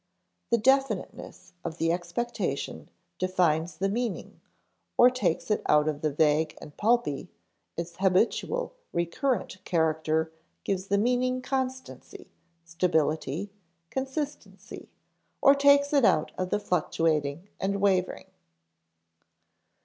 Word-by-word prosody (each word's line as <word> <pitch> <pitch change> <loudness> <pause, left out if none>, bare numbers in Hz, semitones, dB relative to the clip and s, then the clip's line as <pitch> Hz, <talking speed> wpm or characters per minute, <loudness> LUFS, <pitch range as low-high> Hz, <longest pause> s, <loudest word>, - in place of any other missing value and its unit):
The 235 - +4
definiteness 265 -3 0
of 165 -1 -5
the 165 0 +1
expectation 175 +8 -3 0.3
defines 175 -3 +1
the 195 - 0
meaning 230 +1 -3 0.6
or 245 +1 +7
takes 255 -3 -1
it 210 - +1
out 150 0 +4
of 150 -1 -2
the 155 - 0
vague 155 +1 +2
and 150 - -12
pulpy; 225 - +1 0.5
its 170 0 -5
habitual, 195 - +1 0.2
recurrent 185 - -1
character 160 -1 0 0.3
gives 190 -1 -2
the 200 - +2
meaning 250 +3 +1
constancy, 260 -1 -5 0.3
stability, 165 +1 0 0.4
consistency, 270 +2 -5 0.5
or 275 - +7
takes 280 +1 +4
it 280 -3 +4
out 155 -8 +3
of 185 0 -3
the 205 - 0
fluctuating 165 -3 0
and 200 +1 -1
wavering. 190 -2 +1
185 Hz, 110 wpm, -27 LUFS, 160-245 Hz, 0.6 s, or